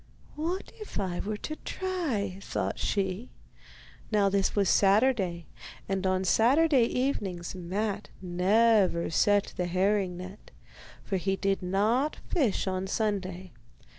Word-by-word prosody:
'What 335 Hz, +5 st, -3 dB
if 425 Hz, -, -6 dB
I 185 Hz, -3 st, -2 dB
were 210 Hz, +1 st, -3 dB
to 310 Hz, -, -5 dB
try?' 280 Hz, -, -3 dB
thought -, -, -3 dB
she. 195 Hz, +3 st, -1 dB, 0.8 s
Now 205 Hz, -2 st, +3 dB
this 195 Hz, 0 st, 0 dB
was 200 Hz, -2 st, +2 dB
Saturday, 195 Hz, -4 st, +3 dB, 0.4 s
and 195 Hz, -1 st, -1 dB
on 185 Hz, 0 st, +1 dB
Saturday 260 Hz, -, +4 dB
evenings 200 Hz, -10 st, -2 dB
Matte 200 Hz, +3 st, -3 dB
never 185 Hz, 0 st, +2 dB
set 205 Hz, +4 st, +2 dB
the 180 Hz, -, -1 dB
herring 185 Hz, 0 st, +1 dB
net, 185 Hz, +3 st, -10 dB, 0.5 s
for 195 Hz, -, -1 dB
he 195 Hz, +1 st, 0 dB
did 195 Hz, 0 st, 0 dB
not 215 Hz, +10 st, +1 dB
fish 270 Hz, -, +1 dB
on 190 Hz, 0 st, -2 dB
Sunday. 190 Hz, -4 st, -2 dB
200 Hz, 125 wpm, -28 LUFS, 185-225 Hz, 0.8 s, Saturday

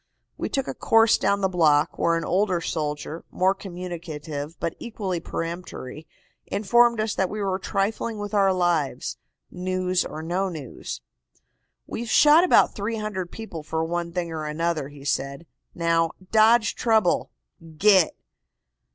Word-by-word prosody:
"We -, -, -3 dB
took 270 Hz, -1 st, -1 dB
a -, -, -3 dB
course 225 Hz, 0 st, +4 dB
down 200 Hz, 0 st, +1 dB
the 190 Hz, -, +3 dB
block, 160 Hz, -4 st, +2 dB
where 170 Hz, -, +3 dB
an 165 Hz, -, -3 dB
older 185 Hz, -1 st, +1 dB
soldier, 155 Hz, 0 st, -4 dB
more 190 Hz, +1 st, +2 dB
communicative 170 Hz, -5 st, -7 dB
but 170 Hz, -, -2 dB
equally 200 Hz, -7 st, -3 dB
peremptory, 165 Hz, -4 st, -6 dB, 0.4 s
informed 235 Hz, +3 st, +3 dB
us 215 Hz, 0 st, 0 dB
that 190 Hz, -1 st, 0 dB
we 215 Hz, -, -5 dB
were 195 Hz, -2 st, -1 dB
trifling 210 Hz, +3 st, -2 dB
with 205 Hz, 0 st, -5 dB
our 195 Hz, -2 st, +4 dB
lives, 175 Hz, -6 st, 0 dB, 0.3 s
news 185 Hz, 0 st, 0 dB
or 155 Hz, -, -7 dB
no 185 Hz, +4 st, -1 dB
news. 135 Hz, -, -7 dB, 0.8 s
"'We've 235 Hz, 0 st, -5 dB
shot 300 Hz, +7 st, +6 dB
about 365 Hz, -, +5 dB
300 210 Hz, -3 st, -3 dB
people 220 Hz, -8 st, -7 dB
for 160 Hz, +1 st, -2 dB
one 170 Hz, +1 st, -2 dB
thing 170 Hz, -1 st, -3 dB
or 155 Hz, -1 st, -4 dB
another,' 155 Hz, -2 st, -1 dB
he 145 Hz, -1 st, -13 dB
said. 140 Hz, +2 st, -2 dB, 0.3 s
'Now, 165 Hz, -1 st, +1 dB, 0.2 s
dodge 220 Hz, +1 st, +5 dB
trouble. 220 Hz, -6 st, +2 dB, 0.5 s
Git! 190 Hz, -2 st, +5 dB
180 Hz, 145 wpm, -24 LUFS, 165-205 Hz, 0.8 s, shot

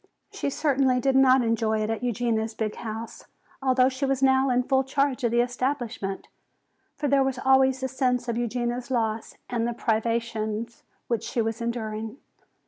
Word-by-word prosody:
She -, -, -2 dB
certainly 270 Hz, -3 st, +2 dB
did 270 Hz, +1 st, +1 dB
not 265 Hz, -1 st, +6 dB
enjoy 225 Hz, -1 st, +1 dB
it 215 Hz, -, -1 dB
at 225 Hz, -1 st, -3 dB
Eugenia's 230 Hz, -2 st, -1 dB
big 215 Hz, -2 st, -2 dB
house, 225 Hz, 0 st, -7 dB, 0.4 s
although 255 Hz, -1 st, +4 dB
she 260 Hz, +1 st, -3 dB
was 270 Hz, 0 st, 0 dB
now 265 Hz, 0 st, +4 dB
in 250 Hz, 0 st, +2 dB
full 265 Hz, +1 st, +2 dB
charge 275 Hz, 0 st, 0 dB
of 235 Hz, -, +3 dB
the 235 Hz, +1 st, +3 dB
establishment. 245 Hz, -5 st, -3 dB, 0.7 s
For 295 Hz, -, -2 dB
there 275 Hz, 0 st, +4 dB
was 265 Hz, -1 st, -1 dB
always 265 Hz, 0 st, +3 dB
the 260 Hz, -, 0 dB
sense 250 Hz, -1 st, 0 dB
of 235 Hz, -, -1 dB
Eugenia's 240 Hz, +1 st, -2 dB
loss 225 Hz, -3 st, -1 dB
and 240 Hz, -2 st, -2 dB
of 240 Hz, -, -4 dB
the -, -, -17 dB
privations 230 Hz, 0 st, -1 dB, 0.3 s
which 235 Hz, -3 st, 0 dB
she -, -, -3 dB
was 225 Hz, 0 st, -1 dB
enduring. 225 Hz, 0 st, -4 dB
245 Hz, 175 wpm, -26 LUFS, 225-265 Hz, 0.7 s, not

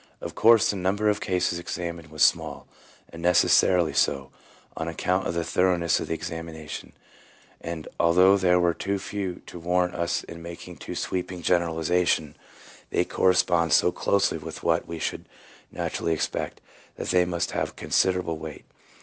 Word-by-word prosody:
Of -, -, -6 dB
course 115 Hz, -2 st, +5 dB
the 100 Hz, -, -4 dB
number 100 Hz, +3 st, +1 dB
of 105 Hz, 0 st, 0 dB
cases 90 Hz, -3 st, 0 dB
examined 85 Hz, -1 st, -5 dB
was 75 Hz, 0 st, +1 dB
small, -, -, +1 dB, 0.4 s
and 85 Hz, -, -10 dB
necessarily 90 Hz, -1 st, +4 dB
so, 70 Hz, 0 st, +1 dB, 0.4 s
on 80 Hz, -, -4 dB
account 90 Hz, +3 st, -1 dB
of -, -, -3 dB
the 85 Hz, -, 0 dB
thoroughness 85 Hz, -1 st, +2 dB
of -, -, -5 dB
the 80 Hz, -, -2 dB
examina 80 Hz, -2 st, -7 dB
tion; -, -, -7 dB, 0.7 s
and 80 Hz, -1 st, -6 dB
although 90 Hz, +3 st, +5 dB
there 90 Hz, -2 st, +3 dB
were 85 Hz, -1 st, +2 dB
too 100 Hz, +4 st, -2 dB
few 95 Hz, -2 st, -5 dB
to 85 Hz, -, -9 dB
warrant 90 Hz, +1 st, +1 dB
us 85 Hz, 0 st, -1 dB
in 85 Hz, -, -10 dB
making 85 Hz, 0 st, -9 dB
too -, -, -7 dB
sweeping 90 Hz, -1 st, -3 dB
a -, -, -16 dB
generalization, 85 Hz, -2 st, +1 dB, 0.5 s
they -, -, +1 dB
corre 95 Hz, -, +3 dB
spond 85 Hz, -3 st, +2 dB
so 90 Hz, -, +5 dB
closely 100 Hz, -4 st, +1 dB
with 80 Hz, +1 st, -8 dB
what 85 Hz, 0 st, +1 dB
we 85 Hz, -, -5 dB
should 80 Hz, -, -4 dB, 0.4 s
naturally 85 Hz, -, -2 dB
expect, 80 Hz, -, -3 dB, 0.3 s
that -, -, -5 dB
they 90 Hz, -1 st, +4 dB
must 85 Hz, -1 st, -2 dB
have -, -, -2 dB
considerable 90 Hz, -4 st, 0 dB
weight. 80 Hz, -1 st, -8 dB
85 Hz, 165 wpm, -26 LUFS, 80-90 Hz, 0.7 s, course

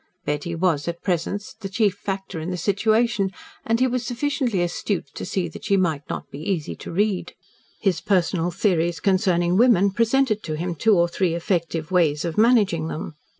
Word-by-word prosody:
Betty 150 Hz, +3 st, -2 dB
was, 165 Hz, -4 st, +1 dB
at 170 Hz, 0 st, -4 dB
present, 190 Hz, +2 st, -1 dB, 0.2 s
the 195 Hz, -, -5 dB
chief 205 Hz, 0 st, +2 dB
factor 195 Hz, -3 st, -5 dB
in 160 Hz, +3 st, -4 dB
the 180 Hz, -, -3 dB
situation, 215 Hz, +2 st, +1 dB, 0.3 s
and 230 Hz, +1 st, +1 dB
he 255 Hz, -, +4 dB
was 250 Hz, -1 st, -1 dB
sufficiently 245 Hz, -, -1 dB
astute 175 Hz, +2 st, -2 dB
to -, -, -6 dB
see 190 Hz, -2 st, -1 dB
that -, -, -10 dB
she 200 Hz, -2 st, +3 dB
might 165 Hz, -6 st, +1 dB
not -, -, -5 dB
be 140 Hz, -, -8 dB
easy 160 Hz, -1 st, -2 dB
to -, -, -8 dB
read. 200 Hz, +1 st, 0 dB, 0.5 s
His 190 Hz, -5 st, 0 dB
personal 180 Hz, -3 st, +1 dB
theories 170 Hz, -3 st, 0 dB
concerning 180 Hz, -2 st, +2 dB
women 205 Hz, -5 st, +5 dB
presented 230 Hz, +1 st, +2 dB
to 155 Hz, -5 st, -4 dB
him 175 Hz, +2 st, -2 dB
two 210 Hz, +5 st, +3 dB
or 170 Hz, 0 st, +4 dB
three 175 Hz, -1 st, 0 dB
effective 170 Hz, -2 st, -2 dB
ways 160 Hz, -4 st, +2 dB
of 170 Hz, -, -3 dB
managing 210 Hz, -8 st, +3 dB
them. 160 Hz, 0 st, -5 dB
185 Hz, 185 wpm, -23 LUFS, 170-215 Hz, 0.5 s, women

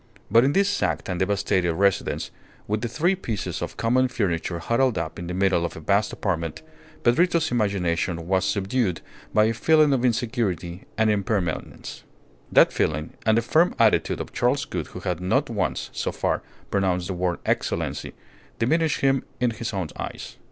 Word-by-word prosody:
But 115 Hz, -, +6 dB
in 140 Hz, +2 st, +2 dB
this 200 Hz, 0 st, +3 dB
sacked 200 Hz, -, -1 dB
and 90 Hz, -1 st, -2 dB
devastated 95 Hz, -3 st, +1 dB
residence, 100 Hz, +1 st, +1 dB, 0.4 s
with 105 Hz, +1 st, -1 dB
the 120 Hz, -, -1 dB
three 160 Hz, -, +1 dB
pieces 115 Hz, -, -4 dB
of -, -, -5 dB
common 130 Hz, +3 st, +2 dB
furniture 90 Hz, -8 st, -1 dB
huddled 115 Hz, +6 st, +1 dB
up 85 Hz, -3 st, -4 dB
in 85 Hz, -, -6 dB
the 90 Hz, -, -4 dB
middle 95 Hz, -2 st, +2 dB
of 85 Hz, -, -3 dB
the -, -, -7 dB
vast 100 Hz, +6 st, +1 dB
apartment, 85 Hz, -5 st, -3 dB, 0.4 s
Pedrito's 165 Hz, +5 st, +3 dB
imagination 90 Hz, -6 st, 0 dB
was 95 Hz, +1 st, +1 dB
subdued 100 Hz, -2 st, 0 dB, 0.3 s
by 105 Hz, -, +4 dB
a 110 Hz, +1 st, +2 dB
feeling 155 Hz, +3 st, +4 dB
of 130 Hz, -2 st, 0 dB
insecurity 110 Hz, -, -1 dB
and 110 Hz, -1 st, +3 dB
impermanence. 100 Hz, -5 st, -2 dB, 0.5 s
That -, -, +6 dB
feeling 75 Hz, +1 st, -1 dB
and 110 Hz, 0 st, +5 dB
the 115 Hz, -, +2 dB
firm 165 Hz, +9 st, +3 dB
attitude 115 Hz, -2 st, +3 dB
of -, -, -6 dB
Charles -, -, +1 dB
Gould -, -, -4 dB
who -, -, -9 dB
had 90 Hz, -2 st, -2 dB
not 90 Hz, -, +1 dB
once, -, -, -2 dB
so -, -, -2 dB
far, -, -, -1 dB, 0.3 s
pronounced 95 Hz, -3 st, +1 dB
the 95 Hz, -, -3 dB
word 90 Hz, -1 st, -1 dB
"Excellency," -, -, -1 dB, 0.4 s
diminished 160 Hz, +6 st, +1 dB
him 135 Hz, -1 st, +2 dB, 0.2 s
in 125 Hz, -1 st, +2 dB
his 115 Hz, 0 st, -4 dB
own 95 Hz, -6 st, -3 dB
eyes. -, -, -7 dB
105 Hz, 175 wpm, -24 LUFS, 90-125 Hz, 0.5 s, But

